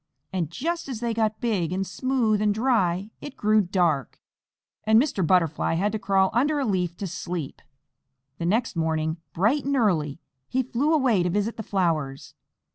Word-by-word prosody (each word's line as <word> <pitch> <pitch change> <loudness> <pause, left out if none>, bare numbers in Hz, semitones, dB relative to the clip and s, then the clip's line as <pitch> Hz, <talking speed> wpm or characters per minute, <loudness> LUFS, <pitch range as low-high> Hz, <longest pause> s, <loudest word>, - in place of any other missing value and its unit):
And 175 -5 -1
just 330 - -3
as 245 -5 -4
they 235 -1 -1
got 220 -1 0
big, 195 -9 0
and 190 +1 -1
smooth, 225 0 0
and 210 -1 +2
dry, 210 -5 +1
it 290 - -9
grew 215 0 +3
dark, 175 - 0 0.6
and 220 +1 +5
Mr. 255 -7 0
Butterfly 165 -3 +2
had 200 +5 +1
to 220 - -3
crawl 195 -1 +2
under 290 +6 +2
a 280 - 0
leaf 180 -5 -1
to 200 - -4
sleep. 170 -4 -5 0.8
The 170 - -1
next 225 +4 0
morning, 160 0 -1 0.2
bright 220 - +2
and 280 +1 0
early, 165 - +1 0.3
he 260 +1 +1
flew 260 +5 0
away 260 - +3
to 175 - 0
visit 205 +5 -1
the - - -5
flowers. 165 -9 -1
205 Hz, 175 wpm, -25 LUFS, 175-235 Hz, 0.8 s, and